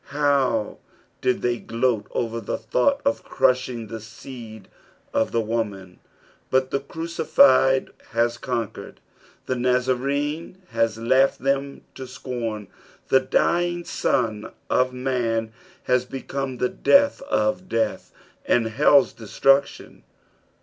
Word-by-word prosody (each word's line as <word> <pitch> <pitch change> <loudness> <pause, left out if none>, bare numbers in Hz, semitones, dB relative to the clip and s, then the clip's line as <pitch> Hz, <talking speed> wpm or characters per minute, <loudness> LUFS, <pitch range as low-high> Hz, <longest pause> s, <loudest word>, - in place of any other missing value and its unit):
Uow 140 -6 +1 0.4
did 125 - 0
they 120 -1 0
gloat 115 -2 -1
over 115 -1 -3
the 100 - -3
thought 280 0 +1
of 280 0 0
ciushiug 125 -3 0
the 115 +1 -6
seed 110 -1 -11 0.5
of 110 - +1
the 115 - +1
woman 105 -5 -4 0.3
\ - - -33
but 130 0 +1
the 140 - +1
Crucified 140 -3 +3 0.2
has 120 +1 +1
coDquered, 120 -4 -4 0.5
the - - -1
Nazarcue 130 +6 -1
has 115 -1 0
laughed 130 +4 +2
them 140 0 -1
to 130 -1 -8
scorn, 120 -5 -5 0.4
the 130 - +6
dying 175 +6 0
San 110 -5 -1 0.3
of 130 - +3
Alan 115 -4 -1 0.3
has 125 0 +1
become 135 0 -5
the 125 - +1
death 280 0 +3
of 110 +13 0
death 115 0 -1 0.4
and 115 -2 +2
liell's 145 -2 +5
destruc 135 +5 +3
tion. - - -14
125 Hz, 120 wpm, -23 LUFS, 115-135 Hz, 0.5 s, the